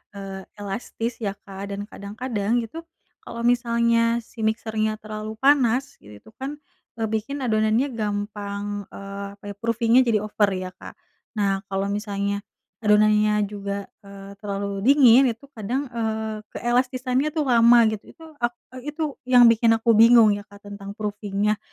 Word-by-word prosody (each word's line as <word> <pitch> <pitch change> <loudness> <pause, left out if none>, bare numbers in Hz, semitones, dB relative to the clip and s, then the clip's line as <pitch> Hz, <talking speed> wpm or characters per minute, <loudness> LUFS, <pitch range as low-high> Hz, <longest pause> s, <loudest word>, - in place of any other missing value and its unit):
eee, 195 -1 -7
elastis 225 +4 -4
ya 200 -3 -3
Kak, 200 0 -8
dan 205 - -5
kadang-kadang 215 +2 -2
itu, 275 +9 -8 0.4
kalau 235 0 -7
misalnya 235 -1 +2
si 230 - -18
mixer-nya 220 -1 -1
terlalu 215 0 -6
panas 270 -1 +3
itu 105 - -14
kan, 275 +3 -4 0.4
eee, 225 - -4
bikin 260 +6 -3
adonannya 220 +4 +1
gampang, 205 -1 -4
eee, 200 0 -7
apa 200 - -42
ya, - - -10
proofing-nya 230 +2 +3
jadi 215 -2 +3
over 210 -1 +1
ya, 185 0 -5
Kak. - - -12 0.4
Nah 195 -2 +1
kalau 195 0 -2
misalnya 200 -1 -2 0.4
adonannya 210 0 +4
juga, 200 -1 -5
eee, 200 0 -11
terlalu 200 -1 -3
dingin, 265 -2 +7
itu 235 +4 -4
kadang, 245 +4 -3
eee, 220 -2 -3 0.2
keelastisannya 255 +3 0
tuh 310 - +1
lama 235 0 +7
gitu, 215 - -6
itu, 325 - -15 0.2
ak 240 0 0 0.2
e 255 +3 -9
itu 310 -4 -3
yang 245 -1 +7
bikin 225 0 +4
aku 230 +1 +2
bingung 230 -1 +7
ya 205 0 -9
Kak 205 0 -17
tentang 200 0 -8
proofing-nya. 210 0 -1
215 Hz, 150 wpm, -24 LUFS, 200-235 Hz, 0.4 s, dingin